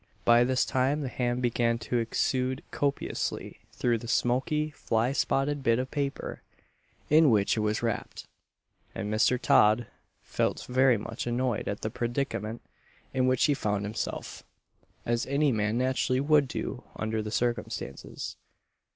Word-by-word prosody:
By 120 0 +6
this 130 0 +2
time 135 +4 +1
the 140 - -2
ham 125 0 -1
began 115 -1 +1
to 120 +1 -1
exude 130 +3 0
copiously 140 -1 -2
through 120 -2 0
the 120 - -8
smoky 150 +7 +1
fly 115 -3 0
spotted 140 +1 0
bit 115 -3 +3
of 130 +1 -3
paper 140 -1 -3 0.7
in 155 -1 +7
which 105 -4 +3
it - - -1
was 105 +1 0
wrapped, 115 -2 -3 0.7
and 105 - -3
Mr. 120 +3 +3
Todd 110 +2 +4 0.4
felt - - -1
very 130 -1 +4
much 110 +3 -5
annoyed 120 -1 -1
at 100 - -3
the 110 - -3
predicament 120 -2 -3 0.5
in 130 -1 +2
which 130 -1 +2
he 150 - +4
found 105 -6 -1
himself 105 +2 -4 0.6
as 120 0 0
any 140 +1 +2
man 110 0 0
naturally 130 0 +1
would 145 0 +4
do 125 0 -4
under 110 0 -2
the 105 - -5
circumstances. 120 - -3
120 Hz, 145 wpm, -28 LUFS, 115-130 Hz, 0.7 s, in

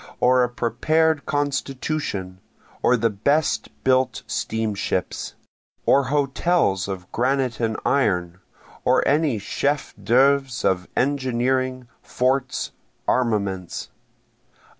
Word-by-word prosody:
or 125 0 +4
a 125 - 0
prepared 155 +6 +1
constitution? 140 -9 -2 0.4
or 125 - +4
the 115 0 +2
best 140 +10 +1
built 130 -2 +2
steamships? 105 -4 -2 0.5
Or 140 0 +4
hotels 140 - +1
of 95 -2 -6
granite 130 -1 0
and 110 -2 0
iron? 90 -10 +1 0.4
or - - +3
any 145 -4 +2
chef 140 +8 -1
d'œuvres 135 0 +3
of 95 -1 +1
engineering, 130 -1 0
forts, 130 0 -1 0.4
armaments? 100 -7 -1
125 Hz, 95 wpm, -23 LUFS, 110-140 Hz, 0.5 s, or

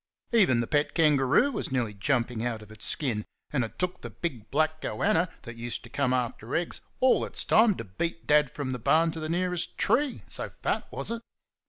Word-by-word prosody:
Even 185 - +4
the - - -1
pet 145 +4 0
kangaroo 150 - +4
was 215 - -4
nearly 120 -5 0
jumping 115 +1 0
out 115 -3 -2
of 105 - -15
its 110 - -7
skin; 120 -9 -1 0.3
and 130 -4 +2
it 115 0 -7
took 180 0 -2
the - - -6
big 120 -11 -5
black 155 0 +1
"goanna" 185 -3 +1
that 120 -1 -9
used 120 0 -3
to 120 - -13
come 140 -2 +1
after 125 -2 -2
eggs 170 +1 -1 0.2
all 260 0 +5
its - - -2
time 220 -2 +5
to - - -5
beat 165 - -4
Dad 150 -2 +4
from 140 -2 -4
the 125 - -3
barn 160 +7 +3
to 160 - -6
the 155 0 -4
nearest 180 0 0
tree, 255 +6 +1
so - - -4
fat - - -2
was - - -2
it. 230 0 -3
145 Hz, 210 wpm, -28 LUFS, 120-175 Hz, 0.3 s, all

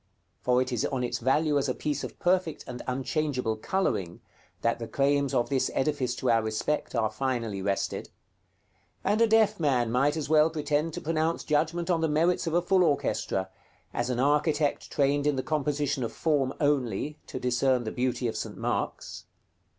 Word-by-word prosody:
For 125 0 +3
it 130 - -7
is 120 0 0
on 130 -3 -1
its 120 - -2
value 145 +4 +2
as 140 - -1
a 130 - -1
piece 145 -2 -2
of - - -7
perfect 180 -3 0
and 125 -1 -7
unchangeable 130 -2 -1
coloring, 110 - -1 0.4
that 115 0 +1
the 115 - -5
claims 140 +1 +1
of 120 - +1
this 135 -2 +1
edifice 135 -3 0
to 125 - +1
our 115 -1 +4
respect 110 +7 -2
are 110 -2 +1
finally 115 -5 -2
rested; 100 0 -2 0.9
and 210 +3 +2
a 230 - +6
deaf 220 -2 +3
man 125 -7 +1
might 140 +5 +2
as 150 -3 -3
well 155 +1 +5
pretend 155 0 -1
to - - -5
pronounce 160 +1 0
judgment 165 +4 0
on 165 -2 +1
the 160 - +1
merits 165 +4 +2
of 165 - 0
a 175 - +3
full 185 +1 +4
orchestra, 95 - 0 0.4
as 120 +1 -1
an 125 -1 -1
architect 150 +2 +1
trained 145 +1 +1
in 145 - +2
the 130 - -2
composition 145 -3 -1
of 115 - -3
form 145 -5 +1
only, 145 -1 0
to - - -5
discern 125 0 +1
the 110 - -4
beauty 125 0 -1
of 115 - -3
St. - - -5
Mark's. - - -3
140 Hz, 185 wpm, -28 LUFS, 125-155 Hz, 0.9 s, a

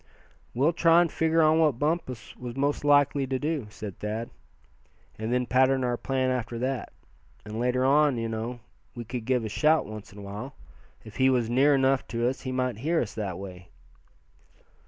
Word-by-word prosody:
"We'll 145 +7 +3
try 165 +1 +5
and 170 -3 0
figure 160 0 +2
on 155 +1 +4
what 150 -6 +3
Bumpus 145 -6 -2
was 125 -1 -7
most 145 +2 0
likely 145 -1 +3
to 130 0 -1
do," 145 -4 -2
said 105 -2 -8
Thad, 110 +2 -4 0.9
"and 110 +1 -3
then 125 0 +1
pattern 130 +1 +3
our 125 -1 0
plan 130 +1 -1
after 120 -2 -3
that. 130 +1 -3 0.5
And 110 +1 -6
later 125 +1 +1
on, 145 -1 +4
you 115 0 -2
know, 115 +2 -4 0.3
we 120 -1 -6
could 120 0 -5
give 125 -2 +1
a - - -2
shout 155 +8 +3
once 110 +1 -9
in 100 - -15
a 100 - -9
while. 105 +7 -7 0.5
If 110 - -11
he 130 0 +4
was 120 -3 +1
near 140 +4 +4
enough 135 0 +2
to 115 +1 -1
us 130 +2 -2
he 130 - -4
might 125 -3 -1
hear 160 +6 +1
us 115 - -3
that 100 -5 -4
way." 90 -2 -9
125 Hz, 195 wpm, -27 LUFS, 115-140 Hz, 0.9 s, try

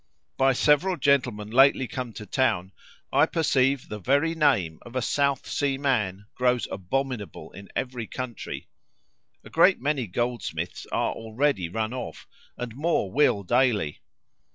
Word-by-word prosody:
By 135 0 +3
several 150 +8 +3
gentlemen 125 -8 +1
lately 135 +1 +5
come 125 -1 -5
to 105 - -8
town, 110 -8 0 0.4
I 145 +4 +5
perceive 140 -5 +1
the 105 - -6
very 145 - +2
name 130 - +2
of 120 +1 -13
a 130 - +1
South 140 0 +1
Sea 140 -2 0
man 105 -9 0
grows 125 -1 +1
abominable 115 +3 -3
in 100 0 -12
every 125 -3 -3
country. 125 -5 -6 0.8
A - - -13
great - - +5
many 135 -3 -1
goldsmiths 90 -6 -3
are - - 0
already 110 - -1
run 110 +5 -2
off, 125 -2 -7 0.3
and 120 -2 -5
more 145 - 0
will 130 -7 +3
daily. 115 - +1
125 Hz, 140 wpm, -26 LUFS, 105-140 Hz, 0.8 s, lately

